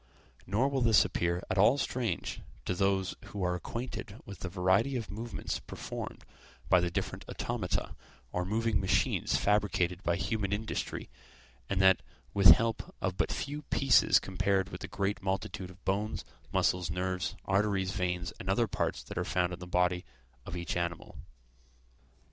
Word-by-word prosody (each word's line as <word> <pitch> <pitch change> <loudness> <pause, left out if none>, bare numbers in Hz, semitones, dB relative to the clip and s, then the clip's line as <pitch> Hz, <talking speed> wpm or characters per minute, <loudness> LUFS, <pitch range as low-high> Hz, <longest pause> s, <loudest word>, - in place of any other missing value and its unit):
Nor 110 +8 +2
will 135 -2 0
this 115 -4 +6
appear 85 -1 -1
at 95 - 0
all 115 +7 +6
strange 120 -9 -2 0.2
to - - 0
those 95 0 +1
who 100 -2 -5
are 90 0 +1
acquainted 115 +3 -5
with 100 -3 -9
the 95 - -4
variety 95 +9 +2
of 115 -3 -3
movements 115 +3 -4
performed - - -7 0.5
by 90 - +7
the 90 0 +1
different - - -3
automata, - - -2 0.4
or 90 - -1
moving 110 +2 +1
machines 95 - +2
fabricated 95 -4 +1
by 85 -3 +1
human 100 +1 -1
industry, 110 +2 -3 0.6
and 100 - 0
that 95 -1 +6 0.3
with 100 -2 +6
help 115 0 +4
of - - -1
but - - 0
few 145 +1 -3
pieces 135 -2 +5
compared 95 0 0
with - - -8
the 95 - -4
great 100 +2 -1
multitude 95 -1 -2
of 95 +1 -16
bones, 105 +3 -1 0.3
muscles, 90 -2 +2
nerves, 90 +1 -2
arteries, 95 -1 +1
veins, 90 -1 -2
and 95 - -5
other 110 +5 +3
parts 105 - -2
that - - -5
are - - +1
found 90 0 0
in 90 - -6
the 90 - -8
body 90 0 +2 0.4
of 90 - -4
each 85 -1 -3
animal. 85 -1 -3
95 Hz, 160 wpm, -31 LUFS, 90-105 Hz, 0.6 s, by